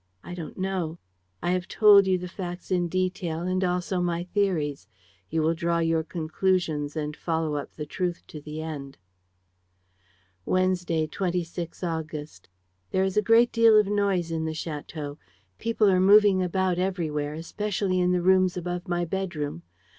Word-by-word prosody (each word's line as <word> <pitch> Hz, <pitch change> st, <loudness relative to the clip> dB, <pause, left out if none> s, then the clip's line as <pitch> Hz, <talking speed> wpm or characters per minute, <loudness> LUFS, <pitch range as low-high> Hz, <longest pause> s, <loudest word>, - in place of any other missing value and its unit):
I 175 Hz, -, -8 dB
don't 170 Hz, -3 st, -7 dB
know. 185 Hz, -4 st, -2 dB, 0.5 s
I 175 Hz, -, +1 dB
have 180 Hz, 0 st, -1 dB
told 205 Hz, -2 st, +6 dB
you 185 Hz, -1 st, +3 dB
the 180 Hz, 0 st, -6 dB
facts 175 Hz, 0 st, -7 dB
in 175 Hz, -1 st, +2 dB
detail 180 Hz, -2 st, -2 dB
and 185 Hz, +1 st, 0 dB
also 180 Hz, 0 st, 0 dB
my 175 Hz, -1 st, -1 dB
theories. 175 Hz, -, -1 dB, 0.4 s
You 160 Hz, 0 st, 0 dB
will 160 Hz, +1 st, +3 dB
draw 170 Hz, 0 st, 0 dB
your 165 Hz, -1 st, +2 dB
conclusions 160 Hz, -2 st, -1 dB
and 150 Hz, -1 st, -3 dB
follow 160 Hz, -2 st, -1 dB
up 145 Hz, -, -4 dB
the 150 Hz, -, -5 dB
truth 175 Hz, +3 st, -3 dB
to 150 Hz, -, -8 dB
the 155 Hz, +2 st, -6 dB
end. 140 Hz, -4 st, -7 dB, 1.5 s
"Wednesday, 180 Hz, -, +1 dB
26 175 Hz, 0 st, -3 dB
August. 155 Hz, -, -5 dB, 0.4 s
"There 190 Hz, -, +1 dB
is 190 Hz, -1 st, -1 dB
a 210 Hz, -, +4 dB
great 230 Hz, +3 st, +5 dB
deal 230 Hz, -2 st, +6 dB
of 210 Hz, -, +3 dB
noise 195 Hz, -4 st, 0 dB
in 160 Hz, -1 st, -1 dB
the 160 Hz, -, -2 dB
château. 150 Hz, -2 st, -6 dB, 0.4 s
People 225 Hz, -2 st, +2 dB
are 185 Hz, -2 st, +4 dB
moving 200 Hz, 0 st, +6 dB
about 185 Hz, 0 st, 0 dB
everywhere, 155 Hz, -6 st, -1 dB
especially 185 Hz, +2 st, -2 dB
in 180 Hz, 0 st, +2 dB
the 180 Hz, -1 st, +1 dB
rooms 185 Hz, -1 st, +4 dB
above 180 Hz, +1 st, -4 dB
my 175 Hz, -1 st, 0 dB
bedroom. 165 Hz, -, -3 dB
175 Hz, 160 wpm, -26 LUFS, 160-185 Hz, 1.5 s, told